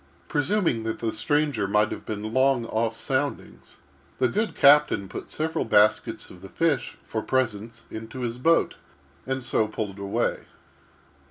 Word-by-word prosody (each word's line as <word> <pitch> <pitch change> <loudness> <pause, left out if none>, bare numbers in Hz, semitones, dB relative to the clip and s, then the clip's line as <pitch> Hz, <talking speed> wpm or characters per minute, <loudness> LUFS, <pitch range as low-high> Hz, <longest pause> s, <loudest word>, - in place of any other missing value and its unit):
Presuming 155 - +1
that 110 0 -3
the 115 -1 -2
stranger 115 -1 0
might 105 +1 +2
have - - -7
been 110 +1 -4
long 130 -2 +3
off 115 0 -1
soundings, 110 - -3 0.4
the 130 - +3
good 210 - -1
captain 140 -8 +5
put - - -8
several 160 +1 -1
baskets 105 0 +2
of 90 - -14
the 95 - -10
fish, 160 0 0
for 110 - -3
presents, 115 -3 -2
into 110 +4 -7
his 120 0 -3
boat, 165 +6 +2 0.5
and 130 -1 -2
so 110 -3 +1
pulled 105 -2 -5
away. 100 0 -1
115 Hz, 150 wpm, -25 LUFS, 105-140 Hz, 0.5 s, captain